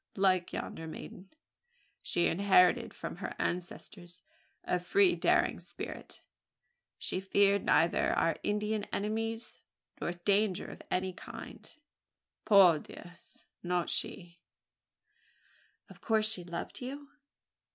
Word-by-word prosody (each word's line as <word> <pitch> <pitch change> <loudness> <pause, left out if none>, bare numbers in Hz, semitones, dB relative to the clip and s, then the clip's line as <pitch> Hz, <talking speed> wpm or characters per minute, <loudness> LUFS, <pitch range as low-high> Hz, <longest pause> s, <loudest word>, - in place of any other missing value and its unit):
Like 185 -2 +2
yonder 160 - -5
maiden, 185 +4 -9 0.7
she 175 - 0
inherited 180 -1 +4
from - - -7
her - - -5
ancestors 175 0 -5 0.4
a 180 - 0
free 370 - +3
daring - - +2
spirit. - - -8 0.8
She - - -2
feared 200 +1 +3
neither 170 +1 +3
our 165 -2 +2
Indian 210 0 -1
enemies, 225 +2 -3 0.4
nor 175 - -2
danger 195 +2 +1
of - - -11
any 185 0 -1
kind - - -10 0.7
Por 185 -6 +7
Dios! 175 +3 -13 0.2
Not 175 -1 -1
she." 175 -2 -3 1.5
"Of - - -15
course 220 -1 +2
she 185 -5 -2
loved 170 +7 -6
you?" 280 +3 -7
190 Hz, 110 wpm, -32 LUFS, 175-210 Hz, 1.5 s, Por